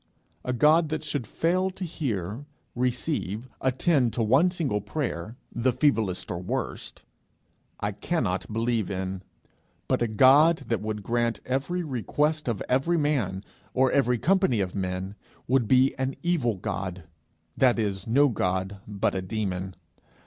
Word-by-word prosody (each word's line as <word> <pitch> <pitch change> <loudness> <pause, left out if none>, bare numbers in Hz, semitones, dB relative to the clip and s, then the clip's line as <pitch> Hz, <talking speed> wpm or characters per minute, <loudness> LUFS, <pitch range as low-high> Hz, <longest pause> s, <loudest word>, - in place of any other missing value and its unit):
A 125 - -2
God 150 +5 +4
that 155 0 -3
should 145 -6 -3
fail 185 +7 +1
to 190 0 -6
hear, 120 - -4 0.3
receive, 125 - -2
attend 130 -1 +2
to 115 - 0
one 135 +11 +4
single 150 - -1
prayer, 115 - -4 0.2
the 125 +2 +2
feeblest 115 -8 +1
or 85 - -3
worst, 90 - -4 0.8
I 105 - -1
cannot 105 - -2
believe 115 -1 0
in; 95 -1 -3 0.7
but - - +1
a 120 - +2
God 140 +9 +5
that 115 - 0
would 105 -1 -4
grant 120 0 0
every 140 +8 -1
request 150 +3 -1
of 115 -5 -1
every 135 +7 +2
man 125 - 0 0.3
or 130 0 +4
every 125 -3 +3
company 185 - +2
of 95 -2 -1
men, 95 0 -3 0.3
would 125 -3 +2
be 130 +3 +4
an 130 +1 -1
evil 150 -11 +1
God 95 -1 -4 0.5
that 125 -2 +4
is 100 -3 -2
no 140 +6 +5
God, 95 -2 -1
but 100 -2 0
a 95 - -2
demon. 95 -2 -3
120 Hz, 145 wpm, -26 LUFS, 100-145 Hz, 0.8 s, God